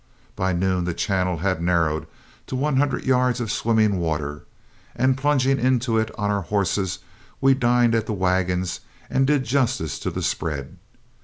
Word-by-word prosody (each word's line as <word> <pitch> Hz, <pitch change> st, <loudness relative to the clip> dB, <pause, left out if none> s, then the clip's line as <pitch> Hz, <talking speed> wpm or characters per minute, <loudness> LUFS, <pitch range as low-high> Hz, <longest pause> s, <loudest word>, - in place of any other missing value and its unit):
By 95 Hz, 0 st, 0 dB
noon 90 Hz, 0 st, 0 dB
the 85 Hz, -1 st, -2 dB
channel 90 Hz, -3 st, 0 dB
had 90 Hz, 0 st, -1 dB
narrowed 80 Hz, -3 st, +1 dB, 0.4 s
to -, -, -4 dB
one 135 Hz, +1 st, 0 dB
hundred 140 Hz, -1 st, 0 dB
yards 125 Hz, -1 st, +2 dB
of 115 Hz, -4 st, -2 dB
swimming 110 Hz, -4 st, +2 dB
water, 75 Hz, -3 st, -3 dB, 0.5 s
and 130 Hz, +2 st, +2 dB
plunging 135 Hz, -1 st, +2 dB
into 125 Hz, -2 st, +2 dB
it 110 Hz, 0 st, -1 dB
on 105 Hz, -2 st, 0 dB
our 100 Hz, -1 st, 0 dB
horses, 95 Hz, -1 st, -1 dB, 0.4 s
we 135 Hz, 0 st, +5 dB
dined 120 Hz, -2 st, +3 dB
at 115 Hz, -1 st, 0 dB
the 110 Hz, -, -1 dB
wagons 90 Hz, -1 st, 0 dB, 0.3 s
and 135 Hz, 0 st, +2 dB
did 145 Hz, -2 st, +2 dB
justice 125 Hz, -, 0 dB
to -, -, -2 dB
the -, -, -4 dB
spread. 75 Hz, +2 st, -3 dB
105 Hz, 165 wpm, -23 LUFS, 90-130 Hz, 0.5 s, we